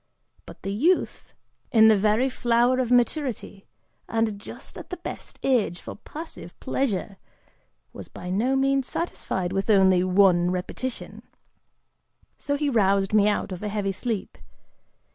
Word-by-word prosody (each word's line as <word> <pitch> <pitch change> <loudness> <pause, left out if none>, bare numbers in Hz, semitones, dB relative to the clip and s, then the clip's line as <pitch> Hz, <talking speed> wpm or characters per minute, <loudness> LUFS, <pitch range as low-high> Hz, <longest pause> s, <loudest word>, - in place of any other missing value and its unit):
But - - -13
the 195 - -3
youth, 330 - 0 0.4
in 220 -3 +7
the 220 - +6
very 215 +5 +2
flower 245 0 +2
of 250 -2 0
maturity, 245 -5 0 0.4
and 225 -2 0
just - - -10
at - - -11
the 360 - -5
best 340 - -8
age 230 -9 +1
for - - -8
passive 210 - -10
pleasure, 210 -7 -2 0.7
was - - -9
by 180 - -8
no 235 +8 +1
means 270 -1 +1
satisfied 190 - -3
with 195 +3 -2
only 190 -3 +5
one 185 -2 +4
repetition, 185 +8 -4 1.2
so 285 - -1
he 295 +1 -1
roused 200 -5 +2
me 210 -1 +5
out 205 -1 0
of 180 - -6
a 210 - -3
heavy 200 -1 -1
sleep. 220 +1 -4
215 Hz, 145 wpm, -25 LUFS, 195-255 Hz, 1.2 s, in